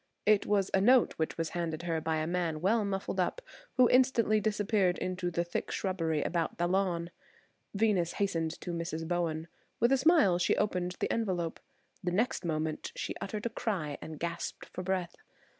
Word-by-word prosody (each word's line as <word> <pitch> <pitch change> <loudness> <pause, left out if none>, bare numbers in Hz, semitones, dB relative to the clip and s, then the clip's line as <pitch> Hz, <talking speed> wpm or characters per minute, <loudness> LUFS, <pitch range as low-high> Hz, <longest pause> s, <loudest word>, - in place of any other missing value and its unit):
It 210 -1 +4
was 200 -2 +2
a 190 - +4
note 250 +4 +5
which 160 - -2
was 165 -1 -1
handed 170 -1 -3
her 165 -2 -1
by 160 0 0
a 155 0 0
man 170 -2 -1
well 210 +6 +2
muffled 195 -1 -2
up, 185 - 0 0.4
who 250 -1 +7
instantly 240 -4 +4
disappeared 205 -3 +1
in 185 - -2
the 175 -2 -1
thick 175 - -3
shrubbery 165 -6 -1
about 170 -2 -1
the 175 - +1
lawn. 175 -2 0 0.6
Venus 195 -5 +2
hastened 165 -5 -1
to 175 - -4
Mrs. 165 -1 -3
Bowen. 165 -2 -1 0.3
With 235 +3 +4
a 270 - +5
smile 270 - +4
she 175 - +2
opened 180 -3 0
the - - 0
envelope. 180 -7 -1 0.4
The 180 - 0
next 220 +6 0
moment 155 -2 -2
she - - -3
uttered 210 +2 -4
a - - +1
cry 185 - -3
and 160 -1 -7
gasped 170 0 -4
for - - -4
breath. 185 -2 -2
180 Hz, 180 wpm, -31 LUFS, 165-205 Hz, 0.6 s, who